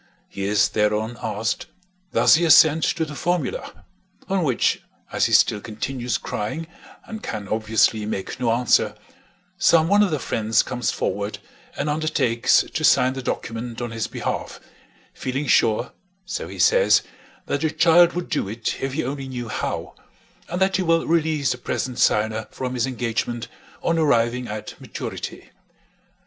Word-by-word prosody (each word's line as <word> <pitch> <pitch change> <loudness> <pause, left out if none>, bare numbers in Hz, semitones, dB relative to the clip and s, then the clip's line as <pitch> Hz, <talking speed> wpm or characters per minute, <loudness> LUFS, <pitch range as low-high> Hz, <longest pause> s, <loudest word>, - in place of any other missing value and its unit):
He 100 - -5
is 100 +1 +3
thereon 105 +2 0
asked, 105 +1 -2 0.4
Does - - +5
he 165 - +4
assent 160 -1 +6
to 160 - 0
the 150 - -8
formula? 170 -2 -3 0.4
on 190 -2 0
which, 130 -6 +1 0.3
as - - +2
he - - -5
still 105 - +4
continues 120 +3 -3
crying 130 +11 -4 0.4
and 220 -1 -7
can 105 -2 -5
obviously 110 0 +1
make 105 +4 -4
no 120 -2 +1
answer, 115 -3 +2 0.6
some 165 -2 +5
one 205 +3 +4
of 205 - +3
the 155 - 0
friends 110 -4 +1
comes 125 -2 -2
forward 100 +1 -2 0.4
and - - -2
undertakes 150 -6 +2
to - - -5
sign 130 +1 +4
the 135 - -5
document 115 -1 -4
on 120 -1 -4
his 115 -1 -3
behalf, - - -4 0.5
feeling 135 +3 -3
sure 115 -2 +2 0.3
(so 185 - -4
he - - -9
says) - - +4 0.4
that 140 - -2
the 160 - +1
child 175 +2 +5
would 180 0 -3
do 145 - -1
it 110 +2 -4
if 135 0 -2
he 160 +3 -1
only 135 +1 -4
knew 120 -3 -5
how, - - -3 0.6
and 175 - -3
that 190 -1 +2
he - - 0
will 165 -2 +2
release 155 -4 +1
the 125 - -4
present 125 0 -3
signer 110 +1 +2
from 130 -1 -5
his 125 0 0
engagement 120 -1 -3 0.4
on 165 -1 +1
arriving 125 -4 +2
at 105 0 -6
maturity. - - -7
125 Hz, 160 wpm, -23 LUFS, 110-160 Hz, 0.6 s, assent